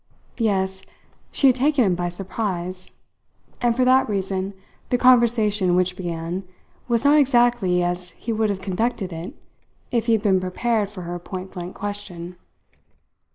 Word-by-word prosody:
Yes, 190 -4 0 0.5
she - - +1
had 260 -2 +6
taken 275 -1 +3
him 190 - +2
by 175 0 -2
surprise, 185 -1 -4 0.7
and 240 -1 +2
for 255 +1 +2
that 260 0 +4
reason 195 -1 -2 0.3
the 250 - +2
conversation 225 -7 +4
which 180 0 +1
began 170 +1 -4 0.4
was 235 +1 +1
not 295 +1 +6
exactly 240 -9 +3
as 175 0 -2
he 230 - -3
would 220 -1 +1
have 195 -2 -2
conducted 195 -1 -2
it 165 +3 -7 0.6
if 235 -1 0
he 230 - +4
had 220 -1 +1
been 190 -3 +3
prepared 210 +3 0
for 195 -3 -8
her 175 +1 -5
pointblank 185 0 -7
question. 185 -4 -6
195 Hz, 150 wpm, -23 LUFS, 180-235 Hz, 0.7 s, had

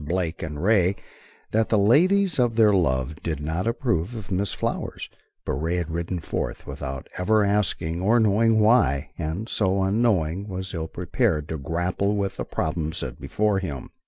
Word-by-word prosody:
Blake 85 +1 -2
and 75 0 -5
Ray, 100 -2 +3 0.6
that 110 0 +1
the 110 - +3
ladies 175 - +4
of 120 -2 +2
their 110 -2 +5
love 75 -4 0
did 80 -4 -3
not 80 +7 -2
approve 115 - -1
of 105 -3 -8
Miss 95 +1 0
Flower, - - -3 0.5
but - - -1
Ray 80 +6 -1
had 85 -2 -2
ridden 85 +2 -2
forth 80 - -4
without 65 -2 -6
ever 105 +3 +3
asking 90 -5 0
or 110 +5 +4
knowing 110 +1 +3
why, 105 - +3
and 85 +8 -3
so, 95 -4 +1
unknowing, 100 -3 +1
was 95 -1 -5
ill 80 -2 -3
prepared 90 - -1
to 80 - -3
grapple 85 +7 -1
with 100 -1 -2
the - - -3
problem 80 0 -2
set 70 -8 -5
before 105 -2 +1
him. 75 -9 -6
95 Hz, 170 wpm, -24 LUFS, 80-110 Hz, 0.6 s, their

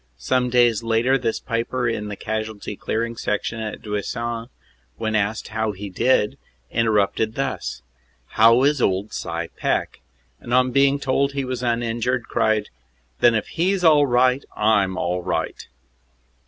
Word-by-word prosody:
Some 125 -1 0
days 120 -3 +3
later 115 +3 +2
this 120 -4 -1
piper 120 +2 -2
in 105 -3 -2
the 105 - -5
Casualty 110 -1 -4
Clearing 115 +3 -2
Station 115 +1 -2
at 110 -1 -5
Duisans, 115 +3 -3 0.5
when 110 0 -2
asked 110 +1 -1
how 110 -1 -1
he 100 +1 -7
did, 105 +1 +1 0.3
interrupted 110 0 +1
thus: 135 - -3 0.5
"How 115 +3 +5
is 145 -1 +2
old 95 +1 0
Cy 85 0 -4
Peck?" - - -1 0.4
and 120 - -2
on 130 0 +3
being 140 +2 +4
told 140 +1 0
he 140 -1 -2
was 130 -1 -4
uninjured, 120 +1 0
cried, 110 -1 0 0.5
"Then 120 -1 +5
if 110 - -1
he 185 +4 +1
s 185 - -4
all 150 -3 +6
right, 125 +2 +3
I 105 -1 +4
m 95 -1 -5
all 90 0 -1
right!" - - -3
115 Hz, 155 wpm, -22 LUFS, 105-125 Hz, 0.5 s, all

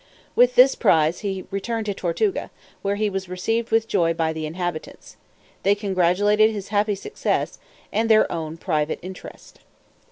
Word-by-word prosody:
With 250 0 +4
this 260 +2 +7
prize 160 +1 +2
he 190 -3 -4
returned 220 +3 -3
to 205 - -1
Tortuga, 195 - -1 0.3
where 200 0 -1
he 215 +1 0
was 190 -2 -4
received 225 +6 -1
with 225 0 +2
joy 170 -6 +1
by 160 -1 0
the 160 -1 -4
inhabitants; 175 0 -6 0.5
they 200 +1 +3
congratulating 205 +2 +2
his 200 -1 -6
happy 205 0 +1
success, 310 - -2 0.3
and 225 +1 +1
their 215 -1 +6
own 160 -1 -4
private 155 -3 -1
interest. 185 0 -11
195 Hz, 155 wpm, -23 LUFS, 170-215 Hz, 0.5 s, this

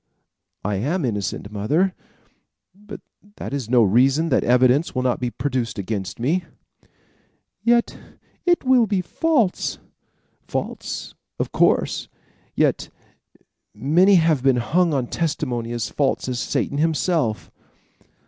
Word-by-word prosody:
"I 105 -1 0
am 145 - -1
innocent, 105 -2 -3
mother; 150 - +1 0.8
but 205 +2 -11 0.3
that - - -7
is 130 -6 -3
no 125 -2 +5
reason 130 - +3
that 130 - +2
evidence 130 +6 +3
will 130 - 0
not 125 -1 0
be 125 - -1
produced 120 -2 -3
against 100 0 -4
me." 160 +10 0 1.2
"Yet 235 0 +2 0.4
it 350 -1 +2
will 255 -3 +4
be 195 -2 0
false." 240 - 0 0.7
"False, - - -4 0.2
of - - -3
course; - - +1 0.5
yet - - +1 0.9
many 165 - +4
have 160 -5 +3
been 135 -1 +3
hung 165 +9 +1
on 135 -4 0
testimony 120 -7 -2
false 135 +4 -1
as 125 -2 -2
Satan 140 - -2
himself." 155 - 0
135 Hz, 120 wpm, -22 LUFS, 120-175 Hz, 1.2 s, no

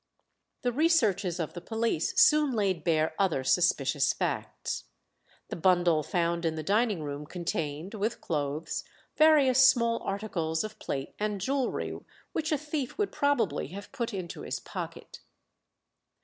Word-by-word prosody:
The 245 - +1
researches 220 - +2
of 165 - -3
the 175 - -7
police 225 -5 0
soon 300 -3 +5
laid 195 -7 0
bare 160 -2 +2
other 180 -9 +1
suspicious 140 -3 +2
facts. - - -3 0.6
The - - -4
bundle 175 -2 +3
found 170 +2 -1
in 165 -1 0
the 155 - -4
dining 205 -1 +1
room 145 0 -5
contained, 165 0 -3
with 215 +2 -2
clothes, 150 0 -2 0.3
various 280 -5 +6
small 235 -3 +4
articles 175 -6 -2
of 215 0 -7
plate 135 -1 -4
and 210 -1 -1
jewellery 265 +6 -1 0.3
which 315 -1 -2
a 305 - +3
thief 295 -3 -4
would 415 -1 0
probably 285 - +1
have 200 +1 -8
put 240 -4 -3
into 185 -5 -6
his - - -4
pocket. - - -7
195 Hz, 140 wpm, -29 LUFS, 165-245 Hz, 0.6 s, various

